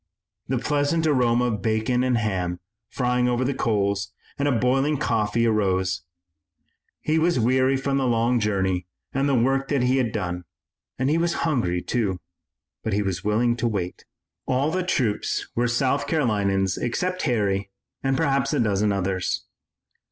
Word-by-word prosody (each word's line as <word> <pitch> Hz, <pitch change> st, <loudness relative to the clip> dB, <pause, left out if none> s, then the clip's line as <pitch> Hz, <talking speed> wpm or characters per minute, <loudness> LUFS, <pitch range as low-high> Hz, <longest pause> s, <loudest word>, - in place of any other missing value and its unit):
The 130 Hz, -, 0 dB
pleasant 145 Hz, +5 st, 0 dB
aroma 125 Hz, -5 st, +3 dB
of 110 Hz, -5 st, -1 dB
bacon 110 Hz, +4 st, +1 dB
and 130 Hz, -2 st, +2 dB
ham 90 Hz, -5 st, -1 dB, 0.3 s
frying 125 Hz, -1 st, +1 dB
over 125 Hz, +1 st, 0 dB
the 140 Hz, -, 0 dB
coals 100 Hz, -4 st, 0 dB, 0.3 s
and 140 Hz, -, +1 dB
of 130 Hz, -5 st, +2 dB
boiling 135 Hz, +5 st, +2 dB
coffee 115 Hz, -3 st, +1 dB
arose. 95 Hz, -4 st, +1 dB, 1.0 s
He 155 Hz, +1 st, +1 dB
was 170 Hz, -3 st, +2 dB
weary 130 Hz, +3 st, +3 dB
from 135 Hz, +1 st, -1 dB
the 130 Hz, -, +1 dB
long 120 Hz, +1 st, +2 dB
journey 95 Hz, -4 st, 0 dB, 0.3 s
and 135 Hz, +2 st, +1 dB
the 135 Hz, -, +3 dB
work 135 Hz, +3 st, +2 dB
that 140 Hz, -4 st, +1 dB
he 130 Hz, +1 st, +2 dB
had 125 Hz, -4 st, +1 dB
done, 90 Hz, -4 st, -3 dB, 0.5 s
and 130 Hz, -, 0 dB
he 155 Hz, +3 st, +2 dB
was 170 Hz, 0 st, +1 dB
hungry, 90 Hz, -, 0 dB
too, 100 Hz, -7 st, -1 dB, 0.6 s
but 110 Hz, -, -2 dB
he 105 Hz, +1 st, +1 dB
was 95 Hz, -2 st, -3 dB
willing 115 Hz, +3 st, +2 dB
to 120 Hz, -, 0 dB
wait. 95 Hz, -5 st, -3 dB, 0.4 s
All 135 Hz, +4 st, +1 dB
the 185 Hz, +2 st, 0 dB
troops 125 Hz, -, -1 dB
were 120 Hz, +1 st, +1 dB
South 130 Hz, +3 st, +1 dB
Carolinians 100 Hz, -, +1 dB
except 180 Hz, +9 st, -1 dB
Harry 100 Hz, -4 st, 0 dB, 0.3 s
and 135 Hz, 0 st, +1 dB
perhaps 140 Hz, -3 st, +1 dB
a -, -, +1 dB
dozen 105 Hz, -2 st, +2 dB
others. 95 Hz, -1 st, -1 dB
120 Hz, 160 wpm, -24 LUFS, 100-135 Hz, 1.0 s, aroma